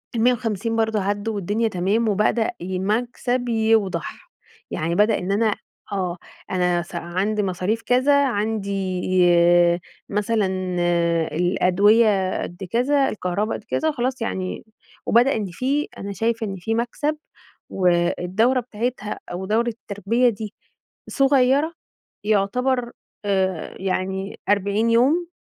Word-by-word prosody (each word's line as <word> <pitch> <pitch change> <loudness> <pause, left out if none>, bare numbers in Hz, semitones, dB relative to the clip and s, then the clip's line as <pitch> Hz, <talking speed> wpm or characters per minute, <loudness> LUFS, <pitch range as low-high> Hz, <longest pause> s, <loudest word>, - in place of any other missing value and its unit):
ال150 230 -2 +1
برضو 220 -1 +1
عدّوا 205 +2 -1
والدنيا 205 +4 0
تمام، 210 +4 0
وبدأ 215 +2 +1
ي 185 +1 -3
مكسب 245 +4 -1
يوضح، 220 -7 0 0.4
يعني 165 +2 -1
بدأ 210 +3 +3
إن 180 +2 -3
أنا 215 +1 +2 0.4
آه، 185 -3 -2 0.3
أنا 180 -1 +1
س 170 +1 -10
عندي 185 +5 -1
مصاريف 190 +4 -1
كذا، 280 +4 +3
عندي 200 -5 -2 1.1
مثلًا 210 +1 +1 0.9
الأدوية 190 +3 +3
قدّ 175 +2 -7
كذا، 270 +3 +2
الكهربا 200 +2 -2
قدّ - - -8
كذا، 315 +7 0
خلاص 255 -2 -2
يعني 185 -5 -3 0.4
وبدأ 245 +4 +4
إن 215 -2 -2
في 270 - -1
أنا 200 0 -5
شايفة 225 +3 -1
إن 195 - -4
في 205 +5 -2
مكسب، 265 +6 -1 0.5
والدورة 180 +7 +2
بتاعتها 230 -2 -4
أو 185 +2 -4
دورة 225 +4 +1
التربية 230 +2 0
دي 215 -1 -6 0.6
صغيّرة، 275 +3 +3 0.5
يعتبر، 240 +5 +1 0.3
آآ 190 -4 -1
يعني 190 +1 -3
40 205 +3 +2
يوم، 285 +10 +3
215 Hz, 115 wpm, -22 LUFS, 190-235 Hz, 1.1 s, وبدأ